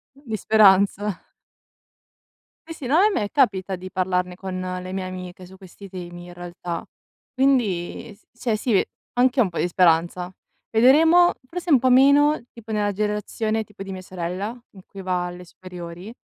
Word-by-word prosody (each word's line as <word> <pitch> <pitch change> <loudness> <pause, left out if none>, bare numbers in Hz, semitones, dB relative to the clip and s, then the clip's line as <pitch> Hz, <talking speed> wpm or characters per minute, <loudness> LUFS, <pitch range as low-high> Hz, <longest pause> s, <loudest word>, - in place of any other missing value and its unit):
Di 260 -6 -5
speranza. 200 -1 +4 1.5
Sì, 325 - -7
sì, 280 - -8
no, 300 +7 +4
e 425 - +5
me 210 - -1
capita 195 -8 +1
di 185 +1 -8
parlarne 180 -1 -1
con 185 -1 -5 0.2
le 185 0 -7
mie 190 0 -3
amiche, 185 0 -8
su 190 +1 -14
questi 190 +1 -13
temi, 175 -1 -9
in 175 - -11
realtà. 175 -1 -6 0.5
Quindi, 230 -8 0
s 205 - -30
cioè 230 -3 0
sì, 210 -2 +2 0.3
anch'io 255 +2 +3
ho - - +6
un - - -6
po' 170 - -6
di - - +1
speranza. 175 0 +2 0.4
Vedremo 320 +10 +5 0.2
forse 350 +1 -2
un 265 - +6
po' 255 - +2
meno, 280 +4 +5
tipo 230 -1 -13
nella 210 -1 0
generazione 215 +2 -2
tipo 210 -2 -11
di 195 - -8
mia 190 -1 -6
sorella, 185 +4 -5 0.2
in 190 - -12
cui 195 - -10
va 180 -1 -1
alle 180 0 -8
superiori, 180 +3 -10
195 Hz, 170 wpm, -23 LUFS, 180-240 Hz, 1.5 s, ho